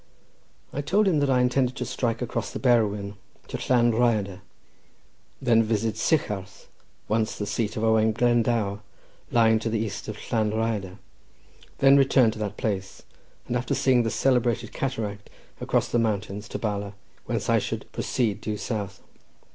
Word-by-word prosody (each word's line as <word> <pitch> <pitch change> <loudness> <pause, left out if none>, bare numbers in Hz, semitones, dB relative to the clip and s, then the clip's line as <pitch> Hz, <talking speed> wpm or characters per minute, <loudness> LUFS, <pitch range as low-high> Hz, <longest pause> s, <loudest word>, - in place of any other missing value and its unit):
I 145 - -2
told 195 +8 +2
him 165 -6 +3
that 145 -1 +1
I 125 -1 +3
intended 125 +1 +1
to - - -3
strike 115 -1 -2
across 115 -1 -3
the - - -6
Berwyn 105 -5 +1 0.3
to - - -4
Llan 120 -2 +4
Rhyadr, 110 -5 +1 1.0
then 115 -3 +4
visit 110 0 0
Sycharth, 100 - -1 0.4
once 110 0 0
the 105 - -3
seat 110 +1 -2
of 110 - -2
Owen 110 0 +3
Glendower, 115 -3 +1 0.5
lying 110 -1 +4
to 115 - -2
the 115 - 0
east 110 -2 -4
of 105 -1 -5
Llan 110 -2 +2
Rhyadr, 110 -4 -2 0.8
then 135 +1 +6
return 130 -4 +4
to 110 - -9
that 105 -1 -4
place, 95 -3 -3 0.4
and 120 - -2
after 120 0 -1
seeing 130 -2 +3
the 115 - 0
celebrated 120 -3 +1
cataract, 110 -6 -4 0.4
cross - - +2
the 120 - +1
mountains 105 -2 -2
to - - -4
Bala—whence 100 -2 -5
I - - +4
should - - -4
proceed 110 -5 -1
due 105 -1 -3
south. 100 -4 -4
110 Hz, 155 wpm, -25 LUFS, 105-120 Hz, 1.0 s, then